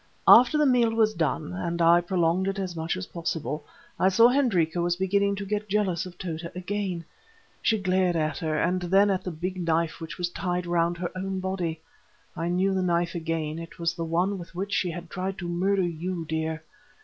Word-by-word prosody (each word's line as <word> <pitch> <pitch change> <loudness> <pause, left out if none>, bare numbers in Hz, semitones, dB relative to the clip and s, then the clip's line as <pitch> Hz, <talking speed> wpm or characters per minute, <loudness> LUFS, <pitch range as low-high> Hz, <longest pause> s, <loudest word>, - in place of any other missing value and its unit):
"After 255 +5 +8
the 300 - +4
meal 250 -4 +4
was 220 -1 +3
done—and 160 - -2
I 170 +1 +6
prolonged 175 +1 +1
it 195 +1 -1
as 185 -3 -3
much 165 +2 -2
as 185 - -4
possible—I 160 +2 -3
saw 230 +5 +6
Hendrika 185 - +2
was 175 0 +1
beginning 200 +2 +1
to 200 0 -5
get 210 +1 -3
jealous 190 -4 0
of 180 -1 -12
Tota 170 -2 -5
again. 185 -2 -3 0.6
She 220 - +2
glared 185 -2 +1
at 155 -2 -1
her 155 -2 -1
and 180 +3 +1
then 195 +3 +4
at 185 -1 -1
the - - -3
big 180 +3 -4
knife 165 0 0
which 165 0 -7
was 175 -1 -1
tied 180 -1 -2
round 170 0 +1
her 175 0 -3
own 190 0 -3
body. 180 -4 -3 0.5
I 165 - -2
knew 185 +3 +1
the 190 - 0
knife 175 -1 +1
again, 165 -2 -3
it 165 0 -9
was 170 0 0
the 170 -2 -4
one 180 +4 0
with 175 0 -11
which 195 +3 -3
she 180 - +1
had 170 +1 -6
tried 190 +2 -4
to 175 - -5
murder 190 +3 +1
you, 175 0 -3
dear. 160 0 -3
175 Hz, 200 wpm, -26 LUFS, 165-190 Hz, 0.6 s, After